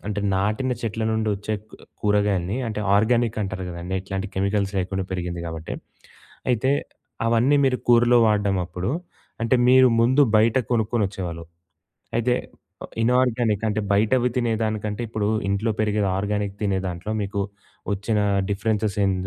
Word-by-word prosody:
అంటే 105 0 -2
నాటిన 105 +7 0
చెట్ల 110 -1 -3
నుండచ్చే 110 -1 -1 0.2
కు - - -13 0.3
కూరగాయల్ని 105 -1 +1
అంటే 105 -1 -3
ఆర్గానిక్ 115 +2 +2
అంటారు 95 -1 -4
గదండీ! 90 +2 -5
ఎట్లాంటి 95 +2 -4
కెమికల్స్ 100 +1 0
లేకుండా 95 +1 -2
పెరిగింది 90 -1 -3
గాబట్టి. 80 -1 -5 0.8
అయితే 125 +2 +1 0.6
అవన్నీ 120 +5 +3
మీరు 130 -1 +2
కూరలో 120 0 +6
వాడడం 100 -2 +2
అప్పుడు 90 +4 -4 0.5
అంటే 115 +3 +2
మీరు 130 0 +7
ముందు 130 +5 +4
బయట 110 +3 +3 0.2
కొనుక్కొనొచ్చేవాళ్ళు. 100 -7 -1 0.7
అయితే 125 +1 +2 0.7
ఇనార్గానిక్ 120 -3 +2
అంటే 110 +1 0
బయటవి 120 +5 +3
తినేదానికంటే 110 -2 -1
ఇప్పుడు 110 -2 -2 0.2
ఇంట్లో 100 +3 0
పెరిగేది 105 -2 +1
ఆర్గానిక్ 105 0 -2
తినే 100 -2 +1
దాంట్లో 90 +3 -5
మీకు 100 0 -3 0.5
వచ్చిన 105 +2 -1 0.3
డిఫరెన్సెస్ 105 0 -1
ఏం 95 - +2
105 Hz, 130 wpm, -23 LUFS, 95-115 Hz, 0.8 s, మీరు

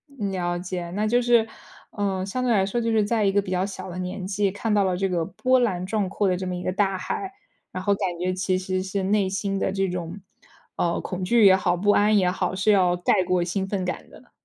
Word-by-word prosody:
了 185 -6 -2
解， 175 -1 -5
那 210 +4 -1
就 240 +3 +2
是， 235 -2 +3 0.4
呃， 195 -2 -2
相 255 +6 -3
对 250 - +1
来 195 -4 +3
说 200 +5 -2
就 230 -1 0
是 220 -2 +3
在 215 0 +1
一 195 - +3
个 200 - +2
比 190 - -7
较 185 +1 +1
小 190 -1 -7
的 175 - -7
年 185 +1 -4
纪， 195 0 0
看 210 +3 -2
到 205 -1 +3
了 185 -1 0
这 195 +1 -1
个 170 -2 0
波 255 +8 +1
澜 185 -7 0
壮 205 0 -1
阔 200 0 0
的 180 -1 +1
这 185 - -4
么 180 - -3
一 180 - -5
个 185 - -1
大 195 0 0
海， 385 - -4 0.4
然 185 - -5
后 200 - +3
感 180 -3 -2
觉 185 +1 -1
其 185 0 0
实 185 0 -2
是 190 +1 -3
内 200 0 +2
心 195 0 -2
的 - - 0
这 195 0 0
种， 175 +1 -5 0.6
呃， 170 -1 0
恐 185 0 -5
惧 225 +3 +4
也 190 -1 +8
好， 180 -1 +1
不 205 +4 +2
安 210 +1 +4
也 180 -2 +3
好， 185 - -2
是 200 +3 +2
要 180 -3 +3
盖 180 +2 +2
过 180 -1 +1
兴 190 +2 -2
奋 195 -2 -2
感 180 - -5
的。 - - -17
190 Hz, 275 characters per minute, -24 LUFS, 185-205 Hz, 0.6 s, 也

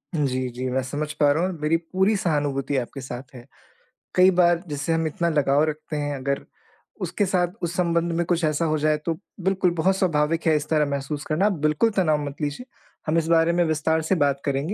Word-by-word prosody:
जी, 130 -4 0
जी। 125 +2 -4
मैं 130 +1 0
समझ 145 +4 -4
पा 145 -2 +3
रहा 160 +4 +1
हूँ 185 - +1
और 160 - -11
मेरी 155 +2 +2
पूरी 190 +5 0
सहानुभूति 145 -5 -1
आपके 130 +2 -4
साथ 130 +1 -8
है। 120 -1 -11 0.7
कई 185 +1 +6
बार 175 -1 +3
जिससे 145 +2 -2
हम 165 0 0
इतना 170 +2 -1
लगाव 145 -2 +2
रखते 155 0 -6
हैं, 145 -1 -2
अगर 140 +1 -2 0.6
उसके 205 - 0
साथ, 180 -2 +1
उस 170 0 -2
संबंध 170 -1 +1
में 170 - +1
कुछ 175 0 0
ऐसा 155 +2 0
हो 155 0 +1
जाए, 155 0 +2
तो 160 +2 -2 0.3
बिल्कुल, 190 -2 +2
बहुत 190 +4 +2
स्वाभाविक 165 -3 +1
है 160 - +5
इस 150 0 -1
तरह 155 -2 +3
महसूस 140 +1 -3
करना। 160 +6 +1
आप 210 - +3
बिल्कुल 155 +9 +2
तनाव 155 -5 +3
मत 140 -1 -6
लीजिए। 150 - -3 0.4
हम 155 +2 +2
इस 165 -1 +1
बारे 165 0 +4
में 175 0 +3
विस्तार 160 0 +1
से 160 +5 +1
बात 140 -3 +1
करेंगे। 140 +6 -1
155 Hz, 220 wpm, -24 LUFS, 145-170 Hz, 0.7 s, कई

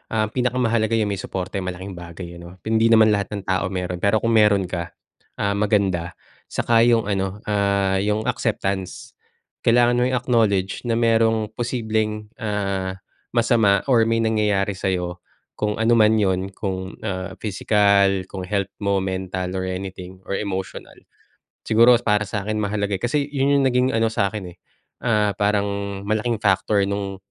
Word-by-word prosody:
ah, 110 -1 0
pinaka-mahalaga 115 -3 +1
yung 105 -2 +1
may 100 - -3
suporta 95 0 -4
eh, - - -5
malaking 90 +1 -6
bagay 85 -1 -9
yun, - - -11
'no, 90 - -13
hindi 110 +1 +2
naman 110 -1 +6
lahat 100 0 -1
ng 100 - -6
tao 95 -1 +1
meron, 90 -1 -4
pero 100 +3 +1
kung 115 - +2
meron 105 -3 +4
ka, 85 -1 -5 0.4
ah, 100 - 0
maganda, 100 -4 0 0.3
saka 115 0 +2
yung 115 -2 +4
ano, 95 0 -2
ah, 100 -2 +1
yung 105 +2 0
acceptance. 115 - -2 0.5
Kailangan 120 +1 +3
mo - - +3
i-acknowledge 115 -5 0
na 115 - +1
merong 115 -2 +2
posibleng, 110 -3 -2
ah, 100 -3 -2 0.4
masama 115 -5 +3
or 115 -3 +5
may 115 0 +1
nangyayari 105 -3 +1
sayo, 90 -2 -2 0.4
kung 105 0 -2
ano 115 +1 +3
man 110 -1 +5
'yon, 95 -1 0
kung, 95 -1 -5
ah, 95 -2 -3
physical, 100 -2 +2
kung 95 -1 -6
health 100 +1 -2
mo, 100 -1 +2
mental, 95 -1 -3
or 95 - -2
anything, 95 0 -6
or 100 - -2
emotional. 95 -3 -5 0.7
Siguro 115 +2 +6
para 105 -1 +2
sakin, 105 +1 -3
mahalaga, 100 -1 -1
eh, 95 - -6
kasi 140 +4 0
yun, 140 0 +2
yung - - +2
naging, 125 0 +2
ano 115 -1 +2
sa 110 -3 0
akin 95 -5 -7
eh, - - -46 0.5
ah, 105 -4 +2
parang 105 0 +1 0.4
malaking 110 +2 0
factor 100 0 +2
nung, 100 -1 -3
105 Hz, 160 wpm, -22 LUFS, 95-110 Hz, 0.7 s, naman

